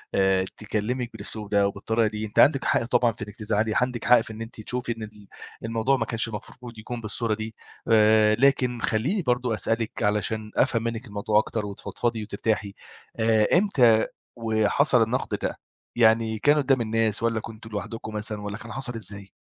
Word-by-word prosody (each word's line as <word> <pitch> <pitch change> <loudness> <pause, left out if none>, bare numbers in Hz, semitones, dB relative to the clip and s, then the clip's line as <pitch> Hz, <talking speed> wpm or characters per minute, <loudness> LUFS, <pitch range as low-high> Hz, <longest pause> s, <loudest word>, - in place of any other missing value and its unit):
آآ 95 -1 +3
تكلمِك 115 +3 -3
بالأسلوب 105 0 -6
ده 100 -1 +3
وبالطريقة 110 +3 0
دي، 105 0 -4
أنتِ 105 - -2
عندِك 140 -2 +5
حق - - +2
طبعًا 120 -1 +2
في 110 -1 -7
إنّك 105 0 -12
تزعلي، 110 -1 0
عندِك 125 -2 -1
حق 120 -1 +6
في 110 - -8
إن 110 - -9
أنتِ 115 -1 -8
تشوفي 125 +2 -1
إن 110 - -6
ال 105 -2 -12 0.4
الموضوع 115 +4 +1
ما 115 - -1
كانش 115 0 +1
المفروض 115 +2 -9
يكون 120 +2 -6
بالصورة 110 +1 -1
دي. 110 +1 -5 0.3
آآ 110 -1 +5
لكن 125 -2 +2
خلّيني 140 - 0
برضه 125 -4 0
أسألِك 115 0 -2
علشان 105 +1 -1
أفهم 115 -1 +2
منّك 115 +1 -3
الموضوع 105 0 +1
أكتر 110 0 -2
وتتفضفضي 110 +3 -3
وترتاحي. 100 -1 -2 0.4
آآ 110 -1 +3
إمتى 125 - +4 0.3
وحصل 115 +4 +2
النقد 115 +3 -2
ده، - - -3 0.4
يعني 110 -1 +3
كان 145 +6 +4
قدّام 135 -3 +2
الناس 110 -1 0
والّا 115 -1 +1
كنتم 110 0 -10
لوحدكم 110 +1 -6
مثلًا 105 0 -1
والّا 105 0 -5
كان 110 +1 -10
حصل 130 -1 -4
إزاي؟ 100 -3 -7
110 Hz, 175 wpm, -25 LUFS, 105-120 Hz, 0.4 s, حق